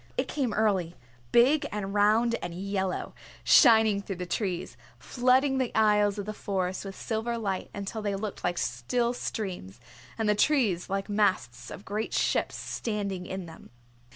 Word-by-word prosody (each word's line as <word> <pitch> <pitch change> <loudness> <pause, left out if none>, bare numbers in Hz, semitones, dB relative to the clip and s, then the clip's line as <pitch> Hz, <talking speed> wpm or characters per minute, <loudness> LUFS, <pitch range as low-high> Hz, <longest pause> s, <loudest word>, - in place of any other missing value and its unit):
It - - 0
came 265 -6 -1
early, 195 -5 0 0.4
big 285 +5 +4
and 200 -2 -4
round 215 +3 +3
and 175 -1 -5
yellow, 190 0 -3 0.3
shining 220 -6 +6
through 195 -1 -5
the 180 0 -5
trees, 185 -1 -3 0.2
flooding 260 +2 +2
the 255 -2 -1
aisles 210 -1 +3
of 200 - -4
the 215 - -4
Forest 190 -2 -3
with 195 -1 -7
silver 235 +1 -3
light 195 -4 -3
until 200 +2 -5
they 205 -1 -1
looked 200 0 -5
like 175 0 -1
still 235 - -1
streams, 180 - -5 0.4
and 220 - -1
the 210 - +4
trees 210 - +1
like 195 0 -2
masts 195 - 0
of 200 - -9
great 215 +2 -3
ships - - +1
standing 200 -5 -4
in 190 -1 -5
them. 165 -1 -13
205 Hz, 160 wpm, -28 LUFS, 190-225 Hz, 0.4 s, shining